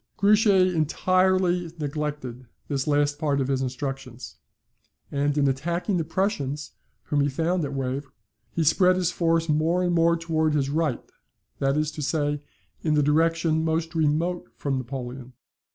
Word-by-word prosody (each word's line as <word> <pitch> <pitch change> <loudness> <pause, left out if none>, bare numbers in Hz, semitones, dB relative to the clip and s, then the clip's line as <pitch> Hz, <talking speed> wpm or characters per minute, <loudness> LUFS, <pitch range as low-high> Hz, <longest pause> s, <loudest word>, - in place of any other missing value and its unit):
Grouchy 200 -3 +4
entirely 180 +2 +2
neglected 145 -4 -4 0.2
this 135 -1 -1
last 145 0 +1
part 145 -3 +1
of 135 0 -1
his 135 -1 +1
instructions; 130 -1 -5 0.7
and 145 +1 0
in 140 -1 +3
attacking 170 +8 -1
the 165 - 0
Prussians 150 -5 -2 0.3
whom 145 -1 0
he 140 - +2
found 165 +5 0
at 140 -1 -3
Wavre, 135 +1 -3 0.4
he 165 - -1
spread 180 +4 +4
his 180 -1 0
force 165 -1 +1
more 160 +4 +2
and 175 -1 +1
more 170 0 +3
towards 160 -2 0
his 140 -1 0
right, 155 -4 -1 0.5
that 135 +1 +1
is 155 0 0
to 150 - -7
say, 145 0 -1 0.4
in 155 -2 +1
the 150 - +3
direction 160 +2 +2
most 160 +1 -1
remote 160 0 0
from 135 -2 -1
Napoleon. 130 0 -7
150 Hz, 150 wpm, -25 LUFS, 140-170 Hz, 0.7 s, Grouchy